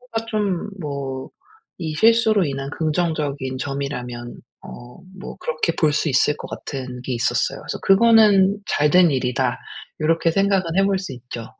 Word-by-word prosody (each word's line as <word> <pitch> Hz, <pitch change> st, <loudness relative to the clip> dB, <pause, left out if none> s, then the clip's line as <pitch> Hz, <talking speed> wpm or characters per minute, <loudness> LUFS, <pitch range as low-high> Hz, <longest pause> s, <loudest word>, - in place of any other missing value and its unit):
그거가 230 Hz, -2 st, -5 dB
좀 205 Hz, -4 st, -2 dB
뭐 140 Hz, -3 st, -5 dB, 0.5 s
이 160 Hz, -2 st, -3 dB
실수로 220 Hz, +1 st, +4 dB
인한 140 Hz, -2 st, -4 dB
긍정적인 150 Hz, -5 st, -2 dB
점이라면 125 Hz, -4 st, -5 dB, 0.3 s
어 120 Hz, 0 st, -11 dB, 0.2 s
뭐 -, -, -8 dB
그렇게 160 Hz, +1 st, -1 dB
볼 155 Hz, -2 st, +3 dB
수 150 Hz, +2 st, +1 dB
있을 145 Hz, +2 st, +2 dB
것 -, -, -9 dB
같은 130 Hz, -3 st, -6 dB
게 130 Hz, -, -4 dB
있었어요. 115 Hz, -, 0 dB
그래서 -, -, -6 dB
'그거는 205 Hz, -2 st, +5 dB
잘된 160 Hz, +2 st, +4 dB
일이다.' 130 Hz, -1 st, 0 dB, 0.4 s
요렇게 165 Hz, +1 st, +2 dB
생각은 190 Hz, -3 st, +1 dB
해 195 Hz, -, +4 dB
볼 195 Hz, -1 st, +1 dB
수 185 Hz, -8 st, -6 dB
있죠. 120 Hz, -2 st, -8 dB
155 Hz, 300 characters per minute, -21 LUFS, 135-195 Hz, 0.5 s, 그거는